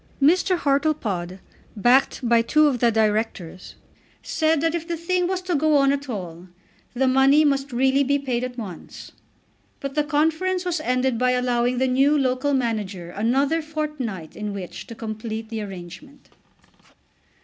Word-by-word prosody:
Mr. 360 +5 +3
Hartlepod, 275 - -1 0.4
backed 245 +3 +2
by 235 0 +4
two 305 +6 +3
of 270 -5 +1
the 235 0 +3
Directors, 215 -5 -2 0.5
said 315 -1 +1
that 330 0 +1
if 335 -1 -4
the 340 -1 -3
thing 360 +2 0
was 370 0 -2
to 365 -1 -2
go 305 0 +3
on 275 -1 +4
at 280 -1 -4
all, 180 -5 -6 0.5
the 265 +2 +2
money 270 +4 +5
must 275 -1 0
really 265 +3 +2
be 280 +1 +1
paid 255 -3 -2
at 255 0 -5
once. 195 -8 -9 0.7
But 275 -1 -5
the 300 +1 +1
conference 325 +5 0
was 350 -2 -1
ended 255 -3 0
by 250 0 +2
allowing 250 0 0
the 260 - +2
new 270 +4 +3
local 265 +1 +1
manager 205 -8 -3
another 270 - +1
fortnight 300 - -5
in 210 -1 -4
which 190 -3 -7
to 230 - -9
complete 220 0 -6
the 225 -1 -4
arrangement. 205 - -10
260 Hz, 160 wpm, -23 LUFS, 225-300 Hz, 0.7 s, money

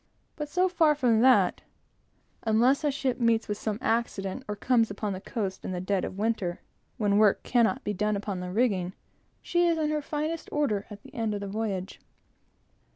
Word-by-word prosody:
But 300 -2 -5
so 365 +4 +2
far 325 -4 +3
from 240 -6 +3
that, 260 +1 +4 0.8
unless 235 +6 +3
a 295 - +3
ship 270 -3 -1
meets 230 -1 +2
with 205 0 -3
some 215 -2 -2
accident, 225 0 -1
or 210 - -3
comes 230 +1 +2
upon 200 0 -3
the 185 - -6
coast 195 -5 -4
in 185 - -4
the 180 - -2
dead 185 +1 0
of 185 - -7
winter, 205 -5 -1 0.4
when 205 -1 +2
work 210 -2 +4
cannot 245 +2 +2
be 210 - -2
done 210 +2 0
upon 200 -2 -3
the 180 0 -5
rigging, 190 -5 +1 0.5
she 345 0 +2
is 335 -1 +2
in 305 -1 0
her 305 -1 0
finest 305 +3 -3
order 220 -9 0
at 210 -1 -10
the - - -15
end 225 -2 -1
of - - -3
the 200 - -5
voyage. 195 -2 -3
220 Hz, 195 wpm, -28 LUFS, 200-265 Hz, 0.8 s, that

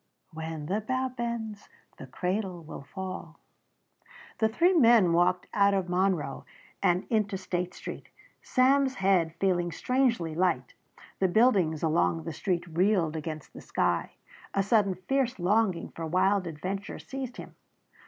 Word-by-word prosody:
"When 160 -1 -5
the 200 +7 -1
bough 260 +4 -1
bends 235 -4 -5 0.3
the 135 - -9
cradle 180 +4 -3
will 155 - -8
fall." 185 0 -7 1.0
The 220 - +3
three 345 +11 +3
men 230 - +5
walked 180 +1 +2
out 200 -1 +4
of 185 -2 -1
Monroe 180 -6 0 0.4
and 180 +1 +2
into 210 -3 +1
State 180 -1 -3
Street, - - -8 0.3
Sam's 265 +1 +3
head 185 -5 +2
feeling 175 -3 +1
strangely 235 -9 0
light. 160 -7 0 0.5
The 190 - +3
buildings 185 -7 +3
along 165 0 +1
the 165 - -5
street 175 +2 -1
reeled 175 -1 +1
against 155 -1 -6
the - - -10
sky. - - -1 0.4
A 195 - +3
sudden 200 -2 +2
fierce 255 +7 -1
longing 190 0 +1
for 165 -1 -6
wild 185 +2 +2
adventure 185 +5 -5
seized 265 -2 -6
him. - - -9
185 Hz, 140 wpm, -28 LUFS, 170-220 Hz, 1.0 s, men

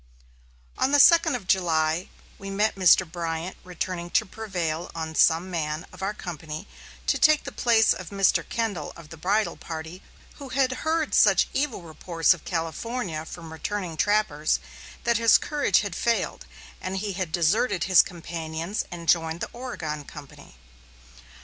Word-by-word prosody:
On 265 - +2
the 290 - +5
second 325 -1 +6
of 210 -7 -6
July 165 -2 +1 0.3
we 195 - -7
met 210 +2 +1
Mr. 185 -1 +5
Bryant 165 +1 -4
returning 180 -1 -4
to - - +2
prevail 180 -6 -4
on 160 -1 -4
some 165 +3 +3
man 155 -1 -3
of 185 - -12
our 200 +2 -2
company 155 -4 -7 0.4
to - - +1
take 305 -1 +5
the - - -6
place 230 -2 +4
of 185 -2 -8
Mr. 195 -1 +2
Kendall 205 -10 -2
of 165 -3 -13
the 165 - -9
bridle 200 +7 0
party, 160 +3 -7 0.4
who 280 -2 -9
had 260 0 +1
heard 315 -1 0
such - - +5
evil 270 -9 -1
reports 165 +1 +1
of 170 - -13
California 165 +1 -3
from 165 -2 -9
returning 180 0 -4
trappers 165 -6 +1 0.4
that 235 -2 +2
his 230 -1 +6
courage 285 -10 +1
had 200 -4 -5
failed, 235 -1 -1 0.3
and 185 +1 -3
he 200 0 -3
had 185 -3 -3
deserted 180 +5 +1
his 185 -2 +7
companions 165 +2 -5
and 170 -2 -8
joined 165 -1 +2
the - - -4
Oregon 165 - -5
company. 145 - -13
180 Hz, 155 wpm, -25 LUFS, 160-215 Hz, 0.4 s, his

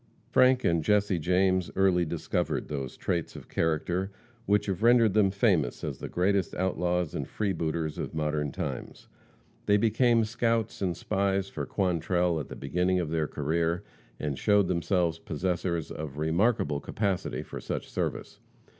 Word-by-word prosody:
Frank 130 0 +5
and 85 -2 +2
Jesse 100 -1 +2
James 90 +2 +2
early 95 -2 +3
discovered 75 - -2
those 70 -3 -4
traits 85 -2 -2
of - - -10
character 85 +4 -1 0.4
which 105 0 +3
have 95 -1 -2
rendered 115 -3 +5
them 105 -2 +4
famous 95 - +1
as - - -4
the - - -6
greatest 95 0 +1
outlaws 90 -2 0
and - - -3
freebooters 80 -6 -2
of - - -4
modern 75 -2 -1
times. - - -6 0.6
They 105 - +5
became 115 +1 +3
scouts 115 -1 -1
and 90 -3 -1
spies 100 -1 0
for - - -5
Quantrell 90 -2 +1
at 75 - -6
the - - -7
beginning 90 +6 0
of 80 -3 -2
their 80 -2 0
career, 80 +5 -1 0.4
and 70 -4 -3
showed 105 -3 +3
themselves 85 -1 0
possessors 85 0 -2
of 75 -2 -6
remarkable 80 0 +1
capacity 100 +2 -2
for - - -8
such - - -4
service. - - -4
90 Hz, 150 wpm, -28 LUFS, 80-100 Hz, 0.6 s, Frank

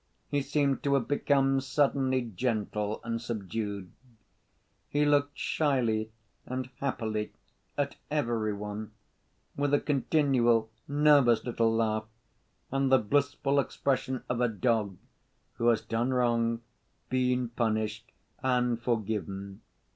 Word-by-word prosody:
He 145 -1 +1
seemed 140 -1 +1
to 140 -1 +2
have 130 -4 0
become 135 -1 +2
suddenly 135 -1 +1
gentle 105 -2 -1
and 115 0 -3
subdued. 100 -4 -4 1.0
He 145 +1 +2
looked 145 -1 +2
shyly 115 -7 0 0.3
and 130 0 -5
happily 110 -6 -2 0.4
at 140 -1 -1
every 120 -7 0
one, 105 +1 -6 0.6
with 145 0 +2
a - - +3
continual 125 -5 +2 0.2
nervous 145 -5 +5
little 115 -2 +1
laugh, 110 -1 0 0.7
and 135 0 +1
the 130 - +8
blissful 140 +4 +1
expression 130 -1 -1
of 125 0 -1
a 125 - +4
dog 110 -4 0 0.6
who 115 - +1
has 115 -2 +4
done 115 +3 -1
wrong, 115 -2 +1 0.5
been 125 -1 +1
punished, 110 -2 -1 0.3
and 125 -2 +1
forgiven. 100 -4 -3
120 Hz, 115 wpm, -29 LUFS, 110-135 Hz, 1.0 s, the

